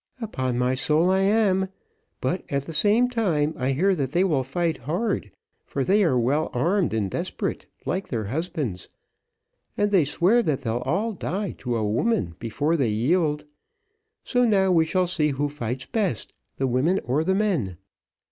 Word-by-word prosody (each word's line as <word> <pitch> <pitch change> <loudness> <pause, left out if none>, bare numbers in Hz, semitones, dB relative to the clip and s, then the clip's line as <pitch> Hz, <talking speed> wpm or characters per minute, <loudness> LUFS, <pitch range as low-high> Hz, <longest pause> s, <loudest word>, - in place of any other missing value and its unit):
"Upon 130 - -2
my 125 +1 +1
soul 155 +6 +2
I 190 - +3
am; 195 -1 +2 0.5
but, 180 - -1
at 140 -1 0
the 165 - -8
same 215 +9 +4
time 175 -11 0
I 130 +1 0
hear, 190 +8 +2
that 140 -5 -2
they 180 - +3
will 155 -8 +2
fight 160 +5 -1
hard, 170 - -2 0.3
for 140 - -3
they 200 +7 +3
are 135 -8 +2
well 140 +6 +1
armed 175 +9 +1
and 110 -3 0
desperate, - - -3 0.2
like 190 +2 -2
their 115 -4 -2
husbands, 130 - -3 0.9
and 205 0 +1
they 190 -5 +5
swear 185 - +3
that 150 - -1
they'll 115 0 -1
all 205 +10 0
die 195 +1 -3
to 120 -2 -2
a 110 -2 0
woman, 105 - 0
before 145 +8 0
they 135 -8 +1
yield; 150 +8 +1 0.8
so 245 -1 +1
now 195 -5 +3
we 165 -2 +4
shall 180 +3 +1
see 165 -4 +1
who 145 +1 -1
fights 130 -3 -4
best, 195 - -2 0.2
the 135 - 0
women 135 +10 +2
or 140 +6 0
the 190 +3 +1
men. 170 - 0
160 Hz, 175 wpm, -24 LUFS, 130-190 Hz, 0.9 s, they